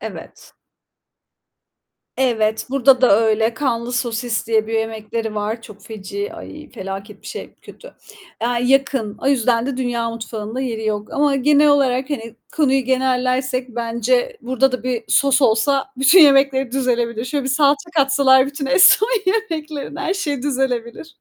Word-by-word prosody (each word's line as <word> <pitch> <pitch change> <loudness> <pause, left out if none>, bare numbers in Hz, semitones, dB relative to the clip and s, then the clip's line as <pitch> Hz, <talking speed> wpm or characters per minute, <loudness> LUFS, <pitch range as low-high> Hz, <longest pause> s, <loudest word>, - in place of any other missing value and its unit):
Evet. - - -10 1.6
Evet, 220 -4 0
burada 270 -1 +4
da 240 -6 +5
öyle 220 +1 +1
"Kanlı 240 -2 -2
sosis" 235 -1 -2
diye 220 -1 +1
bir 225 - -7
yemekleri 220 0 -3
var. 215 +2 -3
Çok 210 -3 -14
feci, 200 -2 -7
ay 95 +1 -11
felaket 195 +2 -8
bir - - -14
şey, - - -8
kötü. - - -14 0.5
Eee, 235 - +1 0.2
yakın. 270 -5 +1
O - - -5
yüzden 240 -2 +1
de 275 -2 -3
dünya 240 -2 -2
mutfağında 225 +1 -6
yeri 225 -4 -4
yok 210 -1 -3
ama 285 -1 +1
genel 295 +2 +3
olarak 270 -1 +1
hani 230 -5 -5 0.2
konuyu 270 -3 +2
genellersek, 255 0 0
bence 240 - -1
burda 260 +1 +1
da 250 -3 -4
bir 245 -3 -3
sos 275 0 +3
olsa 265 +5 +2
bütün 275 +8 +6
yemekleri 275 -3 +4
düzelebilir. 240 -3 -1
Şöyle 275 +2 -3
bir - - -3
salça 285 +3 +1
katsalar 270 -1 +4
bütün 280 0 -5
Eston 380 - +5 0.2
yemeklerine 320 -7 -3
her 385 -1 -1
şeyi 290 -9 -3
düzelebilir. 265 +1 -3
255 Hz, 145 wpm, -19 LUFS, 225-275 Hz, 1.6 s, bütün